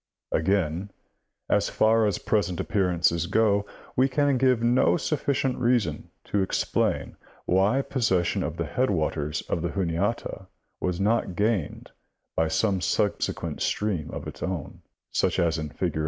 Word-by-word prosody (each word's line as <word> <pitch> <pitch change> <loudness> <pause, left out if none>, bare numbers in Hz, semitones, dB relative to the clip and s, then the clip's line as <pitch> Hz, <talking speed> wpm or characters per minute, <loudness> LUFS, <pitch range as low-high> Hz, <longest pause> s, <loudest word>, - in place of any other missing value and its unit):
Again, 90 +1 0 0.6
as - - +2
far 110 0 +3
as 100 - 0
present 90 -5 0
appear 95 -3 +1
ances 85 -1 +1
go, 105 -1 +2 0.3
we 130 +2 +3
can 140 -1 +2
give 130 -3 +3
no 120 +7 +4
sufficient 140 -5 -1
reason 120 -11 +1
to 100 - 0
explain 95 - 0 0.3
why 100 +9 +3
posses 105 -11 +1
sion - - -1
of - - -3
the - - -1
headwaters 75 0 -1
of 85 - -2
the 85 - -1
Juniata 95 +2 -2 0.3
was 90 -1 -1
not 105 -2 +1
gained 100 -4 -1 0.4
by 80 - +2
some 95 +3 +1
subsequent - - -1
stream 100 -8 -1
of - - -6
its - - -8
own, 90 -6 -4 0.3
such - - +1
as 85 -2 +2
G, 80 -1 -4
fig. 75 - -2
100 Hz, 145 wpm, -26 LUFS, 85-115 Hz, 0.6 s, no